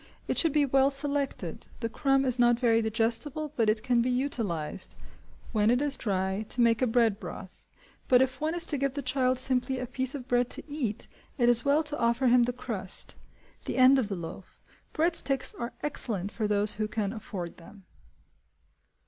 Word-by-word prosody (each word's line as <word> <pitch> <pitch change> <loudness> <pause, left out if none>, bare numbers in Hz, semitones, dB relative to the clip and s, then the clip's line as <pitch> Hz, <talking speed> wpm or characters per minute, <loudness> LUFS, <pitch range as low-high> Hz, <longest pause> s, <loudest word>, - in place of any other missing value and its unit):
It - - -1
should 330 - +3
be 295 0 +3
well 270 0 +3
selected; 280 0 -2
the 230 - -2
crumb 270 +3 +1
is 255 -1 0
not 240 -1 +4
very 230 -2 +3
digestible, 235 +7 -1
but 225 -5 +2
it 215 0 0
can 245 -2 +2
be 245 - 0
utilised, 225 - -3 0.6
when 215 -1 +2
it 245 +1 +3
is 285 -1 +1
dry, 190 -2 -1
to - - 0
make 230 -2 +3
a 255 - +3
bread 225 -3 +2
broth; - - -10 0.4
but 250 - +5
if 260 0 0
one 315 +2 -1
is 345 - +3
to 290 - 0
give 275 0 -1
the 285 - -4
child 255 0 +1
simply 260 +1 0
a 255 - -3
piece 260 +2 -2
of 260 -3 -7
bread 245 -1 +1
to - - -5
eat, 275 -8 -4 0.3
it 240 -3 +3
is 240 0 +4
well 290 +3 +3
to 295 -1 -2
offer 235 +3 +1
him 245 0 +5
the 245 - -1
crust, 215 -6 -3 0.5
the - - -3
end 260 +1 +6
of 235 - -1
the 195 - -3
loaf. 170 +2 -9 0.3
Bread 330 +2 +1
sticks 275 -4 +2
are 235 +1 -6
excellent 210 -9 -2
for 220 -2 -2
those 205 0 +2
who 215 - 0
can 210 -1 -2
afford 195 -6 -7
them. 195 +4 -15
245 Hz, 200 wpm, -28 LUFS, 220-275 Hz, 0.6 s, end